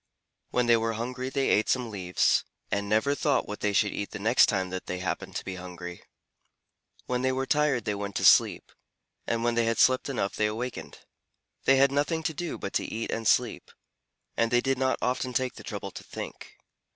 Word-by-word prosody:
When 125 -1 +1
they 120 -1 +5
were 115 0 -1
hungry 125 +3 -4
they 135 0 0
ate 105 - +2
some 125 -3 0
leaves, 90 -3 +1 0.3
and 100 0 -1
never 110 +7 +2
thought 145 0 +1
what 105 - -6
they 105 - 0
should 100 +1 +2
eat 100 - -4
the - - -6
next 115 +5 +4
time 95 -4 -1
that 95 0 -5
they 90 - -3
happened 90 0 -4
to - - -4
be 95 -1 -5
hungry. 90 -1 -8 1.0
When 125 0 -1
they 130 0 +2
were 130 +1 -1
tired 145 -5 +1
they 105 - 0
went 100 0 -5
to - - 0
sleep, - - +5 0.6
and 115 0 0
when 120 0 +2
they 115 0 +2
had 115 0 0
slept 130 +2 +3
enough 110 -7 -2
they 105 - +2
awakened. 120 +4 -5 0.6
They 135 - +6
had 135 0 +5
nothing 150 +3 0
to 160 - -1
do 175 +3 -4
but 100 - -6
to - - +1
eat 115 +1 -4
and 115 -1 -2
sleep, 120 -2 +1 0.7
and 115 - +2
they 120 +1 +3
did 135 +1 0
not 130 0 +1
often 125 0 -1
take 130 0 0
the - - -12
trouble - - -6
to - - -9
think. - - -8
120 Hz, 210 wpm, -28 LUFS, 105-130 Hz, 1.0 s, They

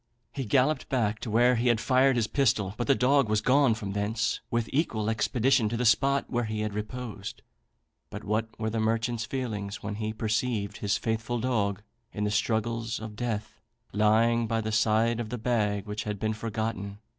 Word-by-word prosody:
He 135 -2 -4
galloped 130 +5 +2
back 110 -5 0
to 120 - -5
where 120 +3 +4
he 120 +2 +1
had 120 -2 +3
fired 130 +2 +3
his 120 -2 +2
pistol; 105 -6 +1
but 120 - -3
the 140 - +5
dog 135 -1 +3
was 110 0 +2
gone 130 +1 +4
from 105 -3 -5
thence 105 +2 -1
with 115 -1 0
equal 110 -8 0
expedition 120 +1 +2
to 115 - -2
the 125 - 0
spot 140 +4 +3
where 120 -1 -1
he 110 0 -3
had 105 -1 -2
reposed. 105 -1 -6 0.7
But - - -7
what 110 +2 0
were 110 0 -1
the 115 - -1
merchant's 115 +1 0
feelings 105 -6 -4
when 105 0 -4
he 110 0 -1
perceived 110 -1 -1
his 100 -2 0
faithful 115 +3 -2
dog, 105 -5 0 0.3
in 105 - -3
the 105 - 0
struggles 115 +2 0
of 110 -1 -7
death, 110 -2 -4 0.3
lying 115 +3 +3
by 115 0 0
the 110 0 -2
side 110 +1 +2
of 115 -2 -4
the 125 - -3
bag 105 -4 0
which 105 0 -4
had 105 -1 -3
been 110 +1 0
forgotten! 110 -2 -4
110 Hz, 190 wpm, -28 LUFS, 105-120 Hz, 0.7 s, the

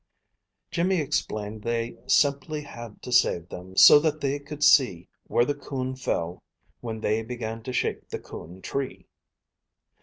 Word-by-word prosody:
Jimmy 180 +1 +1
explained 110 -7 -2
they 115 +1 -2
simply 145 +1 +2
had 120 -6 -10
to 125 - -7
save 85 -7 +3
them 95 +1 -10
so 145 - +10
that 155 0 0
they 140 0 -1
could 145 +1 -6
see 105 - +5 0.2
where 120 - +3
the 145 - 0
coon 130 -2 -4
fell 85 -9 -3 0.4
when 110 -2 -6
they 110 +1 +1
began 115 -1 -5
to 130 - -6
shake 125 - -2
the - - -3
coon 90 +4 -11
tree. 135 -1 -4
125 Hz, 150 wpm, -26 LUFS, 110-145 Hz, 0.4 s, so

